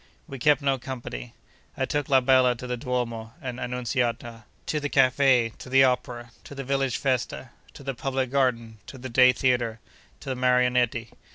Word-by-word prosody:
We 135 - -8
kept 150 +2 +3
no 135 -1 +1
company. 120 - -7 0.4
I 130 - 0
took 145 0 -2
la 135 -1 +5
bella 130 -1 +4
to 125 +2 -9
the 125 0 -2
Duomo 115 -3 -3
and 125 -2 -6
Annunciata, 120 -2 -3 0.2
to 150 - -1
the 145 0 -3
Café, 130 -3 +3
to - - -10
the 135 +1 +6
Opera, 120 -2 -1
to 140 - -11
the 135 - -5
village 135 -1 0
Festa, 130 -1 -2 0.2
to - - -11
the 135 0 -3
Public 130 0 -2
Garden, 115 -5 0
to 135 - -10
the 130 +1 -7
Day 125 +1 +6
Theatre, 120 -3 0 0.4
to 140 - -7
the 130 - -1
Marionetti. 125 -2 +1
125 Hz, 180 wpm, -25 LUFS, 120-135 Hz, 0.4 s, the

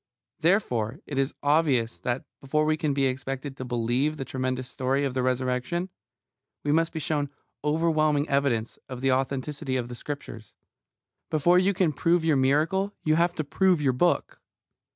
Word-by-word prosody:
Therefore 145 - +1
it 140 -2 -3
is 135 +1 0
obvious 145 -6 +2
that, 125 +1 -2
before 150 +3 0
we 155 0 +2
can 155 -2 -1
be 140 -1 +1
expected 135 +1 -3
to 130 - -6
believe 125 +5 0
the 135 - -4
tremendous 130 -1 -2
story 135 +2 0
of 135 - -2
the 130 - 0
Resurrection, 130 +7 -1 0.7
we 145 - +1
must 165 +2 +2
be 160 - -4
shown 145 -2 -1 0.3
overwhelming 155 -1 +2
evidence 135 -5 0
of 130 -1 -6
the 135 0 +2
authenticity 135 +2 -1
of 125 -2 -2
the 120 - -6
Scriptures. 125 -5 -7 0.7
Before 175 +4 +4
you 190 +1 +2
can 175 -4 +2
prove 170 +4 +2
your 160 -2 +4
miracle 155 +9 +2
you 155 - +3
have 170 +2 +2
to 155 - -1
prove 185 +4 +2
your 140 -3 +2
book. 175 +8 +1
140 Hz, 170 wpm, -26 LUFS, 130-155 Hz, 0.7 s, Before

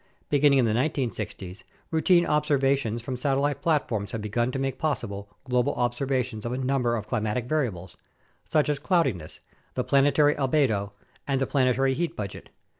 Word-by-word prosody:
Beginning 145 -1 +5
in 130 - +4
the 110 - +1
1960's, 115 - -3 0.3
routine 170 +2 +4
ob 150 0 +2
servations 135 -5 +1
from 130 0 -4
satellite 140 +2 0
platforms 115 -10 0
have 115 - -3
begun 120 +4 0
to 135 - -3
make 135 0 -2
possible 100 -10 -3
global 125 -1 0
observations 125 -2 -1
of 120 - -3
a 125 - -2
number 130 -2 0
of 110 -3 -4
climatic 110 +1 -1
variables, 120 - -2 0.5
such 155 -2 +2
as 145 -2 0
cloudiness, 135 - 0 0.3
the - - 0
planetary 145 +2 +4
albedo, 125 -8 +1 0.3
and 135 -2 +1
the 135 - +1
planetary 130 0 +2
heat 170 +4 -2
budget. 100 -3 -6
130 Hz, 160 wpm, -26 LUFS, 115-145 Hz, 0.5 s, Beginning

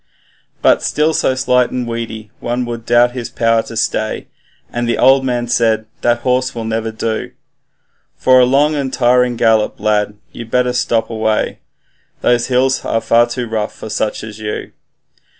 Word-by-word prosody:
But - - +4
still 155 +1 +1
so 130 - +1
slight 125 -1 +2
and 125 -1 -3
weedy, 110 -2 -5
one 120 +1 -2
would 115 -1 -6
doubt 120 0 +4
his 120 -2 -6
power 115 -1 +2
to 115 - -9
stay, 110 -1 -2 0.4
And 120 0 -1
the - - +1
old 135 +1 +5
man 120 -2 -1
said, 110 -2 +1 0.2
'That 120 0 +1
horse 125 0 0
will 115 - -4
never 110 0 -2
do 110 0 -3 0.8
For 130 0 +5
a 125 - +6
long 140 +4 +3
and 140 -3 -2
tiring 125 -1 +2
gallop 110 -2 +2
lad, 105 0 0
you'd 115 -1 -9
better 125 +1 +1
stop 115 -2 0
away, 110 -1 -1 0.6
Those 120 -1 +2
hills 130 +1 +1
are 115 - 0
far 120 +1 +3
too 120 +1 -4
rough 110 -1 -3
for 110 - -8
such 105 - -2
as 110 -1 -9
you.' 105 -1 -5
120 Hz, 170 wpm, -16 LUFS, 110-125 Hz, 0.8 s, a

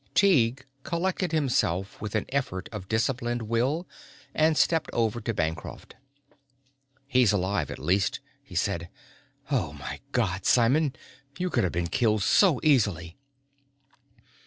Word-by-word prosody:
Tighe 130 - +3 0.2
collected 180 +3 -1
himself 120 - 0
with 105 0 -4
an 110 - 0
effort 130 -9 -2
of 105 -4 -7
disciplined 120 +1 0
will 125 +10 0 0.5
and 155 0 +3
stepped 165 -2 +2
over 115 0 0
to 110 - -2
Bancroft. 80 -6 -4 1.1
"He's 125 -5 +3
alive, 100 0 0
at - - -6
least," 95 +2 0 0.2
he - - -14
said. 85 0 -1 0.6
"Oh - - 0
my - - -7
God, - - 0
Simon! 130 +4 +3 0.4
You 180 0 -2
could - - +2
have 90 - 0
been 85 +1 -1
killed 110 +2 +1
so 175 - +4
easily." 100 - +2
120 Hz, 130 wpm, -27 LUFS, 100-145 Hz, 1.1 s, so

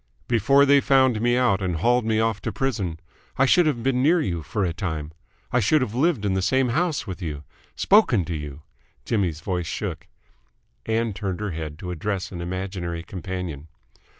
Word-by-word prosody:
"Before 130 +5 +4
they 140 0 +5
found 130 -5 +3
me 120 +1 +2
out 120 -6 +2
and 90 -2 -1
hauled 120 +7 +2
me 110 -1 +1
off 110 -2 0
to - - -3
prison, 100 -12 -2 0.4
I 135 - +4
should 170 +5 +4
have 120 -6 -1
been 125 -1 +1
near 165 +6 +4
you 85 - -2
for 95 +6 -2
a 85 - -1
time. 80 -4 -4 0.4
I 125 - +3
should 140 +7 +3
have 110 - -4
lived 135 -4 +1
in 100 - +1
the 95 - 0
same 130 +6 +2
house 155 -1 0
with 95 -2 -7
you, 75 -4 -5 0.3
spoken 145 - +4
to 85 - -4
you 75 -1 -7 0.2
!" - - -39
Jimmy's 90 -8 -1
voice 90 -2 -2
shook. - - -4 0.8
Ann 110 0 0
turned 95 -1 -4
her 105 -2 -3
head 80 -2 -5
to 90 +2 -6
address 90 +2 -3
an 85 -3 -6
imaginary 90 -1 -4
companion. 90 -4 -6
100 Hz, 195 wpm, -24 LUFS, 85-125 Hz, 0.8 s, they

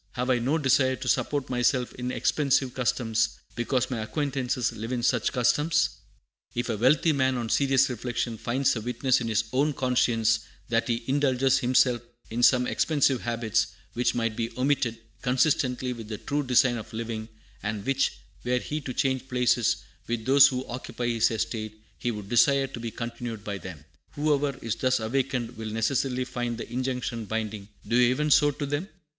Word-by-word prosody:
Have 125 +1 -1
I 125 - +3
no 135 +7 +1
desire 130 -3 +3
to 130 +1 -7
support 145 +2 0
myself 125 0 +1
in 125 0 -4
expensive 135 -2 +1
customs, 115 -3 0 0.2
because 125 +2 -1
my 120 - -2
acquaintances 130 0 -1
live 115 +2 -6
in 120 -2 -2
such 120 -2 +2
customs? 150 +6 +2 0.7
"If 120 +1 -2
a 110 - -1
wealthy 150 +8 +4
man, 130 -2 +1
on 115 -2 -3
serious 135 0 +3
reflection, 120 -2 -3
finds 130 +3 +1
a 115 - -3
witness 125 +2 +1
in 115 - -2
his 110 0 +1
own 145 +3 +2
conscience 115 -4 +2 0.3
that 115 0 +1
he 115 0 -1
indulges 135 -1 +2
himself 125 -1 +3 0.3
in 120 +2 -2
some 125 0 +5
expensive 140 -3 +2
habits, 115 -2 0 0.3
which 120 +1 0
might 115 -2 -1
be 115 0 -2
omitted, 130 -3 +1 0.2
consistently 125 -1 +1
with 115 -3 -9
the 105 -1 -5
true 145 +6 -2
design 125 -2 +3
of 110 - -8
living, 110 -1 -4 0.3
and 105 0 -4
which, 135 0 +1 0.3
were 125 +1 +1
he 150 +4 -3
to 130 -3 -6
change 130 -1 0
places 125 -2 +2 0.2
with 115 -2 -3
those 135 +1 +7
who 130 -1 -3
occupy 120 0 -4
his 115 -1 +3
estate, 110 -1 -3 0.2
he 120 - -1
would 105 -4 -5
desire 135 +4 +4
to 130 -3 -8
be 115 0 -4
discontinued 115 -2 -6
by 100 -2 -4
them, 85 -7 -9 0.3
whoever 145 -2 0
is 115 - -1
thus 130 -1 +2
awakened 120 0 -2
will 110 -1 -5
necessarily 125 +3 0
find 120 -2 -3
the - - -6
injunction 125 -3 -2
binding, 110 -2 -4 0.2
'Do 115 - 0
ye 125 -1 +5
even 150 +4 0
so 145 +1 +6
to 145 0 -4
them.' 145 +8 -3
125 Hz, 180 wpm, -27 LUFS, 115-135 Hz, 0.7 s, those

